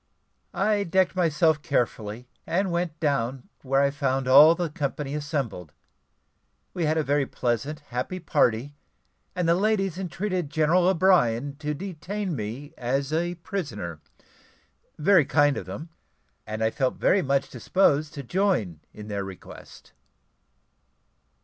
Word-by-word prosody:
I 205 +1 +2
decked 190 0 +1
myself 160 -3 +2
carefully, 120 -5 -2 0.2
and 190 +2 0
went 170 -2 -2
down, 135 -4 -1
where 135 +1 +2
I 140 - +2
found 135 -2 -1
all 145 +5 +8
the 170 -3 -3
company 145 -1 -3
assembled. 135 - -4 1.0
We 170 - -1
had 155 +1 +1
a 155 - +2
very 145 -1 +1
pleasant, 130 +6 -2
happy 135 +7 -4
party, 135 -5 +1 0.6
and 180 -2 0
the 165 - +5
ladies 195 -1 0
entreated 185 -2 -3
General 160 +4 +3
O'Brien 145 -8 +3
to 150 -1 -3
detain 190 +2 -4
me 120 +6 -6
as 135 +4 -1
a 175 +2 0
prisoner 120 - -5 1.0
very 175 +1 +5
kind 145 0 +3
of 90 - -6
them 125 - -7 0.6
and 110 +1 -3
I 110 - +2
felt 130 +1 0
very 195 - +3
much 140 -3 0
disposed 150 +2 +1
to 140 - -6
join 125 - 0
in 105 0 -10
their 100 -2 -3
request. 95 -2 -12
150 Hz, 135 wpm, -26 LUFS, 130-175 Hz, 1.0 s, all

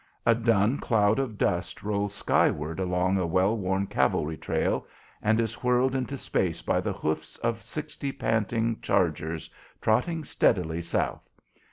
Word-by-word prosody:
A 115 - +6
dun 115 +2 +2
cloud 110 0 +2
of 125 -6 -2
dust 90 -2 -1
rolls 100 -1 -1
skyward 80 -3 +1
along 90 +1 +1
a 90 - 0
well 95 +5 +2
worn 95 -2 0
cavalry 80 -4 +1
trail, - - -1 0.3
and 110 +1 +2
is 115 0 -2
whirled 125 +1 +3
into 135 +1 -2
space - - -1
by - - +1
the - - -2
hoofs 80 0 -3
of 115 -1 -1
sixty 140 +4 -5
panting 115 -2 0
chargers 80 -4 0 0.3
trotting 155 +9 +1
steadily 85 - +1
south. 85 - -2
105 Hz, 145 wpm, -27 LUFS, 90-115 Hz, 0.3 s, A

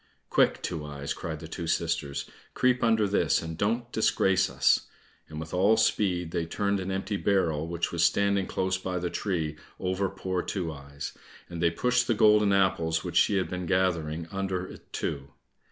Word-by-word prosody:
"Quick, - - +3
Two 75 - -3
eyes," 70 -1 -4
cried - - -6
the - - -7
two 85 - -5
sisters, 80 -4 -1 0.3
"creep 125 0 +2
under 110 -2 +3
this, 100 - +2
and 80 0 -5
don't 115 +7 -1
disgrace 95 -3 +2
us!" - - +2 0.4
and 75 -1 -7
with 80 0 -7
all 100 +5 +4
speed 90 -6 +1
they 85 -1 -2
turned 100 +3 0
an 95 0 -4
empty 95 +2 -2
barrel 85 -7 +1
which 85 0 -2
was 85 -1 +1
standing 100 -1 +2
close 95 0 -1
by 95 -1 -3
the 90 0 -2
tree 80 -7 -2 0.2
over 95 +1 -1
poor 95 -1 -3
Two 90 -5 -3
eyes, 70 -1 -7 0.4
and 85 -1 -5
they 85 - +4
pushed 125 +8 +1
the 115 - +2
golden 105 -1 +5
apples 85 -4 +2
which - - -5
she 100 - +4
had 95 - 0
been 90 -1 -4
gathering, 85 -4 0
under 95 -2 -2
it - - -13
too. 70 -1 -4
90 Hz, 185 wpm, -28 LUFS, 80-100 Hz, 0.4 s, golden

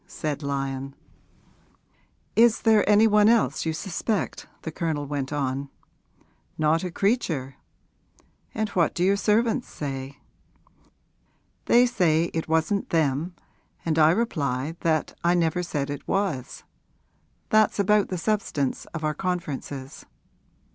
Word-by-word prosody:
said 150 -1 -4
Lyon. 135 -1 -3 1.4
'Is 230 +1 +5
there 220 -2 +5
any 210 +1 +6
one 210 -1 +5
else 230 -7 +2
you - - +1
suspect?' 195 +5 -3 0.2
the 160 - -4
Colonel 155 -2 -2
went 140 -1 -3
on. 140 -1 -2 0.9
'Not 155 +2 +2
a 180 - -2
creature.' 165 - -1 1.0
'And 220 -1 -1
what 175 -4 +1
do 175 - 0
your 195 +2 +4
servants 225 +4 +1
say?' 135 -1 -6 1.5
'They 240 +1 +5
say 170 -9 +1
it 160 - -2
wasn't 160 +5 0
them, 160 +2 0 0.5
and 160 -1 +1
I 155 0 +7
reply 155 - -1
that 160 -2 0
I 175 +1 +3
never 170 0 +1
said 145 -5 -3
it 145 - -7
was. 190 -11 -2 0.9
That's 215 -1 +3
about 205 0 +3
the 185 - -3
substance 165 -8 -1
of 160 - -4
our 155 0 0
conferences.' 145 -6 -5
165 Hz, 125 wpm, -25 LUFS, 145-205 Hz, 1.5 s, I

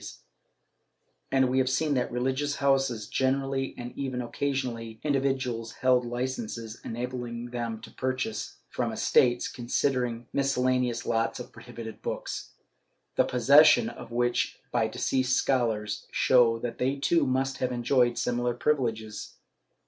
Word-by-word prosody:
IV] - - -9 1.3
PENALTIES 130 0 +2
625 135 -1 0
occasionally 120 -4 -3
individuals 130 -5 -1
held 125 -2 +2
licences 120 -2 -4
enabling 120 0 -5
them 115 -2 -3
to - - -11
purchase 130 -4 -3
from - - -2
estates 120 -1 +3
considerable 120 -1 -1
miscellaneous 125 -3 +1
lots 115 0 0
of 125 - -8
prohibited 120 -1 -9
books, - - -5 0.6
the - - +5
possession 145 - +6
of 120 - -10
which, 120 0 0
by - - +2
deceased 130 -1 +1
scholars, 110 -5 0
shows 115 -3 +3
that 120 - -4
they 130 +2 +1
too 145 +2 +2
must 135 +1 0
have 130 -1 0
enjoyed 120 0 +2
similar 120 0 0
privileges. 115 -6 -1
125 Hz, 105 wpm, -28 LUFS, 120-135 Hz, 1.3 s, possession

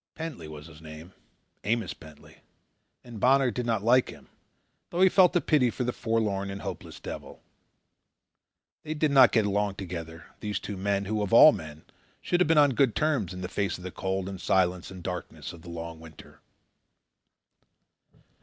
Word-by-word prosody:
Pentley 160 - -6
was 75 -1 -10
his 80 -1 -14
name 80 +3 -11 0.5
Amos 115 +2 -1
Pentley 80 -1 -16 0.7
and 120 -3 -10
Bonner 130 +2 +4
did 120 0 -4
not 110 -4 0
like 125 +3 +4
him, - - -13 0.6
though 175 - -2
he 190 - +7
felt 185 -1 +4
a 175 - +3
pity 140 -6 +3
for 125 - -3
the 125 0 -2
forlorn 105 -4 -1
and 100 0 -7
hopeless 95 -5 -7
devil. - - -9 1.4
They 155 0 -5
did 150 -1 +1
not 130 -3 +7
get 110 -3 +2
along 100 0 0
together, 85 -3 -7
these 105 -1 -3
two 105 - -6
men 100 +1 -1
who, 105 +2 -2
of 105 +1 -2
all 155 +6 +10
men, 80 - -8 0.3
should 175 - 0
have 180 - +3
been 165 0 +3
on 145 -2 +6
good 130 -2 +2
terms 145 - 0
in 90 0 -7
the 90 - -3
face 100 0 -2
of 90 - -13
the 90 - -6
cold 95 0 -3
and 95 -2 -7
silence 90 -2 +1
and 95 -2 -10
darkness 90 -1 -6
of 85 - -13
the 85 - -12
long 85 -1 -7
winter. 80 -1 -14
100 Hz, 180 wpm, -27 LUFS, 90-125 Hz, 1.4 s, all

